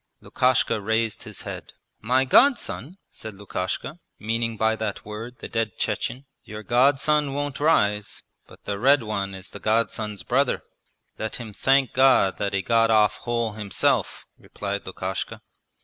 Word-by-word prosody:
Lukashka 125 Hz, -4 st, +1 dB
raised 110 Hz, +1 st, 0 dB
his -, -, -9 dB
head. -, -, -8 dB, 0.3 s
'My 130 Hz, +4 st, +2 dB
godson?' 195 Hz, -, +3 dB
said 110 Hz, -2 st, -9 dB
Lukashka, 100 Hz, -, -4 dB, 0.2 s
meaning 115 Hz, +1 st, -2 dB
by 110 Hz, +1 st, +2 dB
that 110 Hz, -2 st, -4 dB
word 110 Hz, +4 st, -7 dB
the -, -, -8 dB
dead 115 Hz, -3 st, -2 dB
Chechen. 130 Hz, +3 st, -2 dB, 0.2 s
'Your 105 Hz, +1 st, -8 dB
godson 140 Hz, -, +3 dB
won't 145 Hz, -1 st, -3 dB
rise, 105 Hz, -10 st, +1 dB, 0.2 s
but -, -, -18 dB
the 100 Hz, -1 st, -3 dB
red 135 Hz, +2 st, +4 dB
one 100 Hz, -3 st, -3 dB
is 95 Hz, +1 st, -11 dB
the -, -, -8 dB
godson's 110 Hz, -3 st, -1 dB
brother!' 130 Hz, +6 st, +1 dB, 0.6 s
'Let 110 Hz, -, -3 dB
him 115 Hz, -4 st, -7 dB
thank 135 Hz, +3 st, +2 dB
God 130 Hz, -7 st, +4 dB
that 100 Hz, -1 st, -1 dB
he 95 Hz, -1 st, 0 dB
got 115 Hz, +1 st, +3 dB
off 105 Hz, -2 st, +4 dB
whole 115 Hz, -2 st, -2 dB
himself,' 105 Hz, -1 st, 0 dB
replied 100 Hz, -1 st, -5 dB
Lukashka. 95 Hz, 0 st, -5 dB
110 Hz, 150 wpm, -24 LUFS, 105-130 Hz, 0.6 s, red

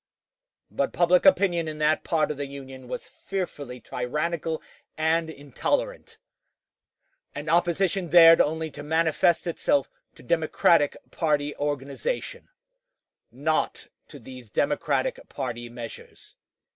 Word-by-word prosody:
But -, -, -1 dB
public 180 Hz, +4 st, +4 dB
opinion 175 Hz, -, +4 dB
in 155 Hz, -1 st, -5 dB
that 155 Hz, +1 st, +2 dB
part 155 Hz, -2 st, +1 dB
of 150 Hz, -, -5 dB
the 140 Hz, -1 st, -4 dB
Union 135 Hz, -2 st, -10 dB
was -, -, -5 dB
fearfully 145 Hz, -10 st, -6 dB
tyrannical 155 Hz, +7 st, -3 dB, 0.4 s
and 160 Hz, +1 st, +1 dB
intolerant; 160 Hz, -, -3 dB, 1.2 s
and 145 Hz, +2 st, -6 dB
opposition 175 Hz, +2 st, +1 dB
dared 165 Hz, 0 st, +8 dB
only 160 Hz, +1 st, -1 dB
to 145 Hz, -, -9 dB
manifest 160 Hz, +2 st, +2 dB
itself 280 Hz, -, 0 dB, 0.2 s
to -, -, -16 dB
Democratic 160 Hz, -2 st, +2 dB
party 150 Hz, -3 st, 0 dB
organization 145 Hz, -, -3 dB, 0.8 s
not 150 Hz, +6 st, -1 dB, 0.2 s
to 145 Hz, -, -11 dB
these 125 Hz, -2 st, -12 dB
Democratic -, -, 0 dB
party 120 Hz, -2 st, -5 dB
measures. 120 Hz, -1 st, -10 dB
155 Hz, 110 wpm, -26 LUFS, 140-170 Hz, 1.2 s, dared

